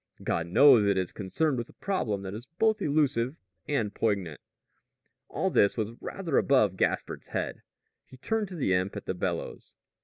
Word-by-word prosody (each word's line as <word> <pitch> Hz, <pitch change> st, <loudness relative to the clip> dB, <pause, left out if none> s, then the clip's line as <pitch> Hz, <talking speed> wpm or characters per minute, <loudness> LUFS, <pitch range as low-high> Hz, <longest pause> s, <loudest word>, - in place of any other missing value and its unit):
God 85 Hz, 0 st, -1 dB
knows 120 Hz, +2 st, +6 dB
it 100 Hz, -1 st, +2 dB
is 95 Hz, -2 st, -1 dB
concerned 125 Hz, +8 st, -1 dB
with 120 Hz, -, -5 dB
a -, -, -16 dB
problem 110 Hz, -, -2 dB
that 95 Hz, 0 st, -5 dB
is 115 Hz, +4 st, -8 dB
both 220 Hz, 0 st, +2 dB
elusive 140 Hz, -3 st, +1 dB, 0.3 s
and 115 Hz, -8 st, -1 dB
poignant." 100 Hz, -9 st, -1 dB, 0.9 s
All -, -, -1 dB
this 100 Hz, -, +3 dB
was 110 Hz, -1 st, -1 dB
rather 170 Hz, -7 st, -1 dB
above 110 Hz, -9 st, +3 dB
Gaspard's -, -, -1 dB
head. -, -, -4 dB, 0.5 s
He 130 Hz, -, -14 dB
turned 220 Hz, -, -1 dB
to 185 Hz, -, -8 dB
the 130 Hz, -, +1 dB
imp 95 Hz, +3 st, 0 dB
at 105 Hz, -, -6 dB
the -, -, -2 dB
bellows. 90 Hz, -, -4 dB
115 Hz, 175 wpm, -28 LUFS, 100-145 Hz, 0.9 s, knows